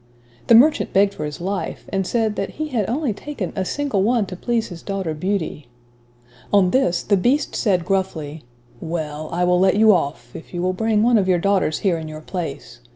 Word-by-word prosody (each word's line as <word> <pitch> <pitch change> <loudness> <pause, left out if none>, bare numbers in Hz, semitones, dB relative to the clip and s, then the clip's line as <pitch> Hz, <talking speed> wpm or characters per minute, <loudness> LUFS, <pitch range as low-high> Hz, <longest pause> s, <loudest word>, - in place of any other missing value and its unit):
The 230 - +7
merchant 295 +6 +4
begged 200 +1 +4
for 150 - -5
his 150 +3 -6
life, 195 +3 -4
and 195 -1 0
said, 220 -3 0
that 195 - -3
he 310 0 -3
had 225 -8 -1
only 265 -1 -1
taken 215 -3 -6
"a 190 - -1
single 275 -1 -1
one 225 +1 +2
to 185 - -7
please 230 +4 -1
his 170 -3 -9
daughter 195 -5 -3
Beauty." 160 -4 -3 0.8
On 195 -3 +4
this, 180 -10 +1
the 205 - +2
beast 250 +10 +1
said 185 -7 +1
gruffly, 175 -6 -2 0.4
"well, 155 -2 -4
I 175 +1 0
will 180 0 +3
let 190 +1 +4
you 215 0 +6
off, 140 -8 -2
if 160 - -10
you 175 - -2
will 185 0 +1
bring 215 +2 +1
one 235 -1 +4
of 190 - 0
your 185 -1 +3
daughters 190 -3 +1
here 175 -4 +2
in 160 - -7
your 155 0 -8
place. 160 - -6
190 Hz, 210 wpm, -21 LUFS, 170-220 Hz, 0.8 s, The